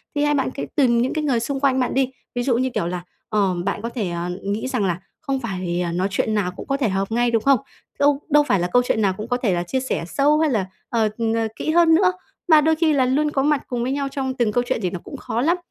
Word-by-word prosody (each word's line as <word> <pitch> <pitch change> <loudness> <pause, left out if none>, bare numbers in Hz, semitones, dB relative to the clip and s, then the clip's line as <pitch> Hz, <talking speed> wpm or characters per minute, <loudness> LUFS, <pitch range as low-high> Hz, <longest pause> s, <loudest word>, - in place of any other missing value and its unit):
thì 290 - +1
hay 295 0 +2
bạn 270 -2 0
cứ 275 - -5
tìm 240 -5 +3
những 250 - 0
cái 310 - -1
người 265 -6 +1
xung 270 +4 -3
quanh 265 -1 +2
bạn 250 - 0
đi. 265 -1 +1 0.2
Ví 245 - 0
dụ 245 -2 +2
như 260 +1 +1
kiểu 170 - -1
là, 175 0 -4 0.3
ờm, 195 -5 +1
bạn 200 - -2
có 230 - -3
thể, 225 -6 -3
à, 170 0 -3
nghĩ 205 +5 -2
rằng 250 -6 0
là 175 -2 -1 0.2
không 275 -3 -2
phải 185 -6 -2
nói 185 +2 0
chuyện 215 +3 0
nào 200 -4 0
cũng 180 - -10
có 275 - 0
thể 260 -6 +1
hợp 195 +2 -2
ngay, 240 +1 +2
đúng 225 -2 +1
không? 275 -3 +4 0.4
Đâu 285 0 +3
đâu 295 0 +5
phải 200 -6 +3
là 175 - 0
câu 245 - +6
chuyện 220 - +1
nào 195 -2 +2
cũng 215 - -5
có 245 0 0
thể 230 -7 0
là 175 0 0
chia 220 +9 -2
sẻ 260 -9 -2
sâu 290 +8 +2
hay 315 -1 +3
là, 215 -8 0 0.2
ờ, 225 -2 +1 0.3
ờ, 225 -1 0
kỹ 315 - -2
hơn 330 -1 +5
nữa, 365 +2 +4 0.4
mà 310 -3 +7
đôi 320 +2 +3
khi 315 -1 +2
là 265 -3 +3
luôn 290 +4 +1
có 270 - 0
mặt 295 -1 +2
cùng 245 -2 -2
với 255 - -1
nhau 280 0 -1
trong 265 -1 -3
từng 240 -4 0
câu 245 +3 +1
chuyện - - 0
thì 185 - 0
nó 180 0 -5
cũng - - -8
khó 235 - -3
lắm. 335 +6 +2
245 Hz, 295 wpm, -22 LUFS, 205-280 Hz, 0.4 s, mà